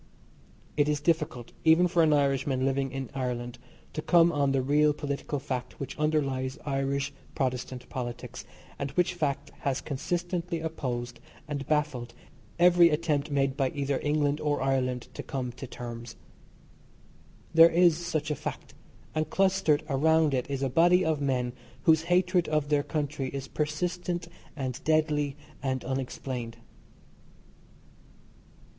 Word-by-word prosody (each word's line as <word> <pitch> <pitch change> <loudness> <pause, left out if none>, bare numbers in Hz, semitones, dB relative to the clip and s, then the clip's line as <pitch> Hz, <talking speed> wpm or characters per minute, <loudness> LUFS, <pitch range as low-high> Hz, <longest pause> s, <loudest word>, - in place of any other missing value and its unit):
It 145 0 +3
is 150 -1 +1
difficult, 150 -6 -1
even 165 +3 +6
for 175 -1 +2
an 160 -1 +4
Irishman 135 -2 +2
living 135 0 0
in 135 -1 -5
Ireland, 125 -2 -3 0.3
to 155 - -3
come 170 +1 +5
on 140 -3 +1
the 135 -1 +1
real 150 +2 +4
political 145 0 -3
fact 130 -3 -5
which 140 - -5
underlies 135 -4 0
Irish 140 0 -1 0.2
Protestant 125 -1 -2
politics, 120 -2 -6 0.4
and 140 - -2
which 180 0 +2
fact 145 -4 -2
has 135 -1 -1
consistently 175 +4 -2
opposed 120 -7 -4 0.3
and 145 -2 -4
baffled 140 -6 -1 0.4
every 175 0 +7
attempt 150 -2 0
made 135 -2 +1
by 135 -2 +1
either 140 -1 0
England 150 0 +1
or 150 -1 0
Ireland 130 -2 0
to - - -5
come 130 -3 -4
to 130 +2 -8
terms. 120 -1 -7 1.4
There 165 0 +9
is 170 -1 +5
such 155 -2 -2
a - - 0
fact, - - -6 0.4
and 155 -1 -1
clustered 190 -5 +2
around 160 +1 +3
it 130 0 -1
is 140 -1 -2
a - - +2
body 175 +6 +4
of 155 -2 0
men 125 -3 0 0.3
whose 160 -1 +5
hatred 180 -1 +3
of 150 -2 0
their 145 -1 +3
country 145 -2 -2
is 135 0 -5
persistent 175 +3 -2 0.3
and 130 -4 -4
deadly 150 -3 +1 0.3
and 130 -2 -1
unexplained. 125 -2 -4
145 Hz, 140 wpm, -28 LUFS, 130-160 Hz, 1.4 s, There